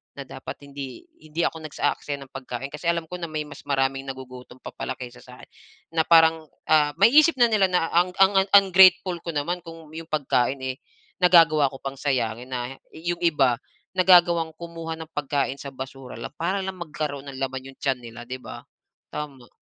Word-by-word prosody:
na, 140 - -6
"Dapat 135 +2 -9
hindi 140 - -8 0.2
hindi 155 +2 -3
ako 160 -1 -7
nag-aaksaya 145 -1 -2
ng 135 - -19
pagkain 130 0 -5
kasi 150 +3 -5
alam 170 -1 -3
ko 180 - -5
na 170 - -4
may 155 -1 -2
mas 145 - -12
maraming 135 -1 0
nagugutom 130 -1 -9
pa - - -8
pala - - -4
kaysa 125 -1 -9
sa'kin," 125 0 -14 0.5
na 160 - +4
parang, 160 -1 +5 0.2
ah, 150 -2 +4
maisip 295 - +6
na 240 - +7
nila 210 -4 +3
na 180 -2 +2
ang 175 +2 +3
ang 195 0 +5
ungrateful 185 -2 +6
ko - - -6
naman 170 +5 -1
kung 165 -2 -11
yung 165 0 -7
pagkain, 135 -3 +1
eh, 130 0 -2 0.5
nagagawa 165 -5 +6
ko 135 - -10
pang 135 0 -5
sayangin 125 -3 -1
na 125 +1 -4 0.2
yung 170 +2 -3
iba 140 -7 +3 0.4
nagagawang 175 -3 +5
kumuha 165 -1 -6
ng 160 - -7
pagkain 140 -2 -1
sa 140 - -7
basura 130 -1 -8
lang - - -7
para 185 +4 -1
lang 190 0 -4
magkaroon 150 -4 -4
ng 130 - -9
laman 135 0 -4
yung 135 - -22
tiyan 135 -2 0
nila 120 0 -9
'di 130 +1 -6
ba? - - -8 0.5
Tama. 140 -5 -7
150 Hz, 185 wpm, -24 LUFS, 135-170 Hz, 0.5 s, na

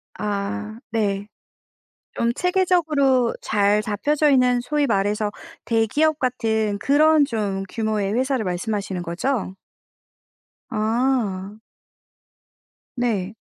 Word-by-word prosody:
아 210 +2 -3
네. 205 -2 -1 0.9
좀 235 0 0
체계적으로 315 -9 +2
잘 205 0 +2
잡혀져 290 +8 +1
있는 250 -2 +4
소위 295 +2 0
말해서 205 0 0 0.4
대기업 290 +8 +2
같은 220 -5 0
그런 300 +3 +4
좀 205 -6 -2
규모의 215 -3 -1
회사를 260 0 0
말씀하시는 190 0 -3
거죠? 190 +4 -2 1.2
아. 220 -3 -1 1.4
네. 215 -5 -1
225 Hz, 185 characters per minute, -22 LUFS, 205-265 Hz, 1.4 s, 있는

